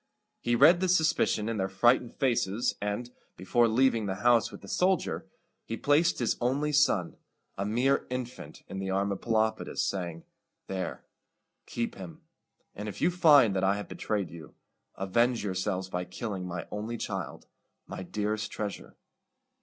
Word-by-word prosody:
He 120 - +1
read 160 +8 +7
this 185 0 +3
suspicion 135 -8 +1
in 115 -1 -2
their 95 -1 -1
frightened 120 +5 +2
faces, 120 -4 +1
and, 105 +4 -3 0.3
before 115 +6 +2
leaving 115 -2 +2
the 95 - -2
house 120 -2 +4
with - - -10
the 100 - -12
soldier, 185 - 0 0.4
he 115 - -5
placed 150 +5 +3
his 120 - 0
only 140 +5 +1
son, 140 - +2 0.4
a 100 +1 -2
mere 125 +6 +1
infant, 125 -11 -6
in 95 - -6
the 95 0 -3
arms 100 +1 0
of 100 - -4
Pelopidas, 110 -1 0
saying, 85 -4 -4 0.4
"There, 95 -1 -5 0.6
keep 115 0 -3
him; 90 -5 -10 0.5
and 105 +1 -5
if - - -8
you 180 - +3
find 145 - +6
that 95 - 0
I 95 +1 +3
have 105 - -6
betrayed 105 -4 -3
you, 80 -3 -11 0.4
avenge 115 +5 +1
yourselves 95 -1 -2
by 90 -1 -3
killing 95 -1 -5
my 85 -1 -5
only 110 +3 -4
child, - - -5 0.4
my - - -7
dearest 105 +3 -2
treasure." 105 -2 -5
110 Hz, 160 wpm, -29 LUFS, 95-125 Hz, 0.6 s, read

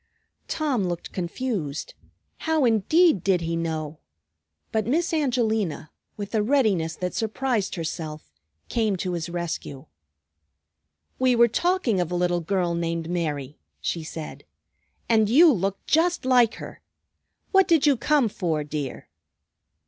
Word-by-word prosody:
Tom 275 -10 0
looked 175 -1 -4
confused. 175 - -3 0.5
How 320 -4 +1
indeed 235 - +3
did 185 -2 +2
he 165 0 -2
know? 160 -2 -3 0.7
But 220 -1 0
Miss 330 +7 +1
Angelina, 225 - 0 0.3
with 205 0 -6
a 220 - +2
readiness 210 - +1
that 180 0 -3
surprised 225 -1 -1
herself, 160 - -5 0.4
came 220 -4 0
to 180 0 -3
his 170 -1 -3
rescue. 170 -5 -5 1.3
"We 255 -1 +3
were 235 0 +6
talking 345 - +1
of 175 -1 -3
a - - -1
little 175 0 +1
girl 175 0 0
named 170 0 -2
Mary," 150 -5 -3 0.2
she 165 - -3
said. 155 0 -7 0.6
"And 220 -2 +3
you 305 +6 +7
look 195 -1 -1
just 335 -1 +2
like 245 -3 +4
her. - - -10 0.7
What 385 -2 +5
did 330 -5 +4
you 285 -2 +5
come 270 +1 +2
for, 165 -7 -2
dear?" 145 -2 -5
195 Hz, 135 wpm, -25 LUFS, 165-255 Hz, 1.3 s, you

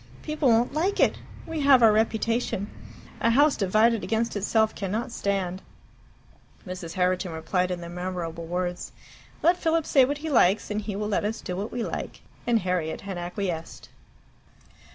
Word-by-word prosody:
People 305 -3 +1
won't 235 +3 +3
like 355 +7 0
it. - - +3 0.3
We 325 -1 -4
have 275 -3 +6
our 225 - +8
reputation. 220 -1 0 0.5
A 230 - +2
house 285 +5 +4
divided 215 +3 +2
against 225 +1 -1
itself 220 +2 +2
cannot 210 +5 -3
stand." 190 -3 -2 1.0
Mrs. 180 -3 -6
Herriton 180 -1 0
replied 180 +3 -1
in 180 -1 -3
the 170 - -7
memorable 175 -2 -5
words, 180 +1 -3 0.5
"Let 345 +2 +5
Philip 330 -2 +1
say 270 - +5
what 285 +3 0
he 315 +2 -5
likes, 210 -5 +3
and 210 +1 -1
he 205 -1 -5
will 210 +1 -2
let 210 - 0
us 220 +2 -2
do 180 - -5
what 200 +4 -4
we 240 -1 -2
like." - - -5 0.3
And 235 -2 +3
Harriet 180 -3 -2
had 195 -3 -5
acquiesced. 175 -2 -5
210 Hz, 165 wpm, -26 LUFS, 180-235 Hz, 1.0 s, our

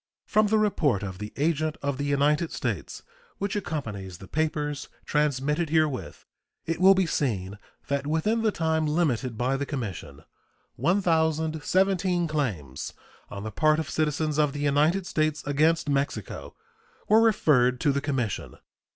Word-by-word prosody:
From 215 0 +3
the 220 +1 +3
report 155 - +1
of 95 -2 -6
the 105 0 -6
agent 155 +1 0
of 140 -1 -2
the 145 - -1
United 145 +3 +2
States, - - -4 0.3
which 200 +1 -2
accompanies 115 - -4
the 95 - -12
papers 150 0 -2 0.2
transmitted 150 +2 0
herewith, 155 -5 0 0.4
it 165 +2 -2
will 195 +1 +8
be 190 -1 +2
seen 105 - -2 0.3
that 140 0 -1
within 185 +9 +1
the 220 -1 +2
time 160 -3 0
limited 140 -7 0
by 130 +3 0
the 140 - -2
commission 100 - -6 0.5
1,017 170 - +1
claims 100 - -3 0.4
on 100 - -7
the 110 - -5
part 155 +7 +3
of 155 -2 -3
citizens 155 0 0
of 150 -2 +2
the 145 - -4
United 150 +6 +2
States 155 -3 0
against 155 +3 +2
Mexico 140 0 -2 0.5
were 220 +1 +6
referred 130 - +3
to 145 0 +2
the 140 0 -1
commission. 130 -8 -2
150 Hz, 145 wpm, -26 LUFS, 135-165 Hz, 0.5 s, will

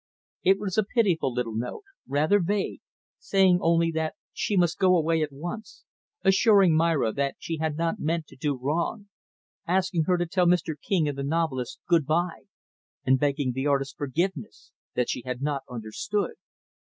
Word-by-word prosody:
It 190 +1 +4
was 200 0 -1
a - - +4
pitiful 195 - +1
little 120 -2 -2
note 120 - -4 0.2
rather 155 +9 +3
vague 200 +3 -1 0.4
saying 190 -2 +3
only 165 0 +3
that 160 -1 -2 0.2
she 205 - -1
must 175 -2 +2
go 185 -2 +5
away 165 0 +1
at 150 -2 -1
once; 175 +11 -7 0.4
assuring 195 -3 +5
Myra 160 -8 +2
that 140 +3 -1
she 165 - -4
had 155 -1 -2
not 170 +5 -1
meant 165 0 -1
to - - -15
do 145 +1 -1
wrong; 170 - -2 0.6
asking 180 -2 +1
her 180 +1 +2
to 175 - 0
tell 180 +1 +1
Mr. 170 -2 +2
King 160 +1 0
and 140 -1 -3
the - - -2
novelist 140 -4 -2
good 165 -5 +3
by; 170 +2 -1 0.6
and 130 0 +4
begging 140 -2 0
the 130 +3 -2
artist's 140 -1 +1
forgiveness 145 - -3 0.2
that 125 - +1
she - - -2
had 125 -1 -4
not 140 0 -1
understood. 125 - -3
165 Hz, 170 wpm, -26 LUFS, 140-180 Hz, 0.6 s, go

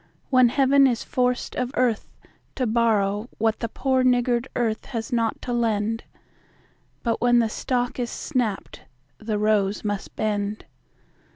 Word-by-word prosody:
when 255 -2 +6
Heaven 275 +1 +4
is 240 -3 -1
forced 250 -1 -1
of 250 -1 -1
earth 245 -4 +1 0.5
to 255 - 0
borrow 215 -1 +1
What 225 0 +1
the 230 - -3
poor 260 +2 +1
niggard 245 0 +2
earth 225 -3 -1
has 230 -1 -5
not 230 -2 0
to 245 - -3
lend; 225 -1 0 1.0
But 230 -2 -1
when 240 0 +4
the 230 -2 +3
stalk 245 +2 -2
is 240 -1 -1
snapt, 240 -9 -3 0.4
the 215 -1 -2
rose 210 -1 +1
must 205 0 -3
bend. 210 -1 -2
235 Hz, 145 wpm, -24 LUFS, 215-250 Hz, 1.0 s, when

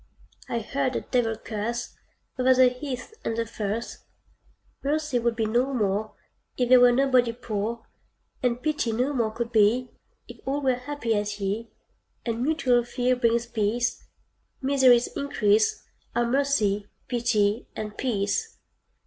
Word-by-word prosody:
I 235 - -1
heard 265 +3 -1
a - - -1
devil 225 -3 0
curse 220 +3 -4 0.4
Over 255 0 +5
the 255 0 +6
heath 250 - -6
and 225 - -2
the 230 - 0
furse: 220 +1 -4 0.8
"Mercy 295 -2 0
vould 235 0 0
be 225 -1 0
no 245 +5 +1
more 210 -1 -1 0.4
If 245 -1 +1
there 255 0 +8
were 245 0 +7
nobody 255 -2 +3
poor, 230 -1 -4 0.6
And 245 -1 0
pity 300 -7 0
no 250 +6 0
more 235 -5 +1
could 235 +2 -4
be 230 +3 +3 0.4
If - - -11
all 275 +2 -1
were 260 -1 +3
happy 250 -2 -2
as 205 0 -2
ye: 205 +4 -2 0.6
And 230 -1 -2
mutual 255 -4 +2
fear 245 +1 0
brings 235 -1 +1
peace, 235 +1 -1 0.6
Misery's 260 -3 +5
increase 215 -6 +1 0.3
Are 240 - +2
mercy, 235 -6 +1 0.2
pity, 230 -3 +1
and 215 -1 -5
peace." 240 - -1
240 Hz, 140 wpm, -26 LUFS, 220-255 Hz, 0.8 s, there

